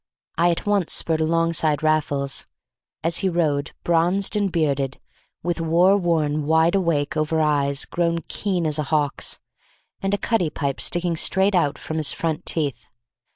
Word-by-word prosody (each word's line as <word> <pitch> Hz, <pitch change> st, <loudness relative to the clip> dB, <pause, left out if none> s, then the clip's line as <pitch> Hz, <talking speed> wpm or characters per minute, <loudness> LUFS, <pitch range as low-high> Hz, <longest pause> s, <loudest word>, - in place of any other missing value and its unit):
I 170 Hz, +2 st, +3 dB
at 170 Hz, -, -1 dB
once 205 Hz, -4 st, +1 dB
spurred 160 Hz, -1 st, 0 dB
alongside 160 Hz, -2 st, +1 dB
Raffles, 145 Hz, -3 st, 0 dB, 0.6 s
as 165 Hz, +1 st, +1 dB
he 190 Hz, -, 0 dB
rode, 150 Hz, -4 st, 0 dB
bronzed 175 Hz, +5 st, +1 dB
and 205 Hz, -2 st, +1 dB
bearded, 140 Hz, -5 st, 0 dB, 0.4 s
with 175 Hz, 0 st, -1 dB
warworn 165 Hz, -3 st, +2 dB
wideawake 160 Hz, -2 st, +2 dB
over 155 Hz, +1 st, 0 dB
eyes 145 Hz, -2 st, +1 dB
grown 170 Hz, -1 st, -1 dB
keen 185 Hz, -5 st, -2 dB
as 155 Hz, -1 st, 0 dB
a -, -, +1 dB
hawk's, 145 Hz, -1 st, 0 dB, 0.6 s
and 195 Hz, +1 st, +1 dB
a -, -, -3 dB
cutty 200 Hz, -5 st, 0 dB
pipe 140 Hz, -2 st, -3 dB
sticking 175 Hz, -1 st, 0 dB
straight 190 Hz, +4 st, +2 dB
out 150 Hz, -6 st, +1 dB
from 160 Hz, -, -5 dB
his 155 Hz, -2 st, +2 dB
front 165 Hz, +1 st, -3 dB
teeth. 140 Hz, -9 st, -2 dB
165 Hz, 150 wpm, -22 LUFS, 150-175 Hz, 0.6 s, I